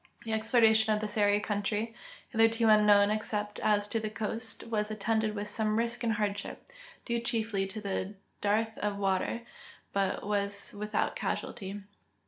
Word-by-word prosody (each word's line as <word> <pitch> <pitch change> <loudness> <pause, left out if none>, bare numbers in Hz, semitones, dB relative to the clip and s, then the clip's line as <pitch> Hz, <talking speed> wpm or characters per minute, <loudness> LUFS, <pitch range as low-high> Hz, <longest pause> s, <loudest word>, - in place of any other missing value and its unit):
The 225 - -2
exploration 220 -1 +4
of 210 - +2
the 215 - -2
Seri 205 -1 +3
country, 210 +2 -2 0.4
hitherto 225 0 +3
unknown 210 -1 +6
except 210 -1 -2
as 205 -1 +2
to 225 - 0
the 215 -1 -3
coast, 225 +2 -4
was 215 -2 -1
attended 215 0 0
with 205 0 -3
some 215 0 0
risk 235 +1 0
and 230 -1 +2
hardship, 205 -1 -3 0.4
due 235 -1 0
chiefly 225 -4 -1
to 200 -1 -4 0.3
dearth 220 +2 +1
of 205 -1 -1
water, 195 +3 0 0.5
but 195 -1 0
was 200 -1 -1
with 210 +1 -5
out - - +1
casualty. 200 -1 -4
210 Hz, 150 wpm, -30 LUFS, 205-225 Hz, 0.5 s, unknown